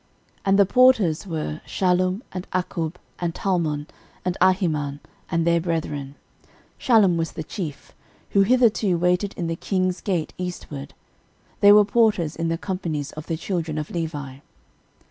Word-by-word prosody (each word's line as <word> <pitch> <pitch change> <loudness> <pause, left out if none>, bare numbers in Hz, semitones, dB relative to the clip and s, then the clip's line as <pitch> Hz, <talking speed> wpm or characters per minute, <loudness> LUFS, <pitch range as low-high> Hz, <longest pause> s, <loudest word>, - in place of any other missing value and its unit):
13:009:017 - - -31
And 195 0 +4
the 200 - +6
porters 210 -7 +4
were, 155 -2 -4
Shallum, 185 +3 0
and 185 0 -6
Akkub, 175 -2 -2 0.2
and 170 -2 -2
Talmon, 160 -6 -1 0.4
and 180 -1 0
Ahiman, 160 -7 +2 0.3
and 165 -1 0
their 170 0 +3
brethren: 150 -5 -3 0.6
Shallum 210 -8 +4
was 165 0 -2
the 160 - -5
chief; 155 -4 -7 0.4
13:009:018 - - -27
Who 200 - +5
hitherto 215 -4 +3
waited 180 +3 +1
in 175 - -2
the 165 0 -2
king's 185 0 -1
gate 175 -6 -2
eastward: 150 -6 -6 0.6
they 205 - +8
were 210 0 +7
porters 205 -7 +2
in 165 0 -2
the 165 0 0
companies 165 -6 -3
of 155 +1 -9
the 165 - -2
children 165 -3 -3
of 155 -1 -4
Levi. 145 -6 -4
175 Hz, 155 wpm, -23 LUFS, 155-190 Hz, 0.6 s, they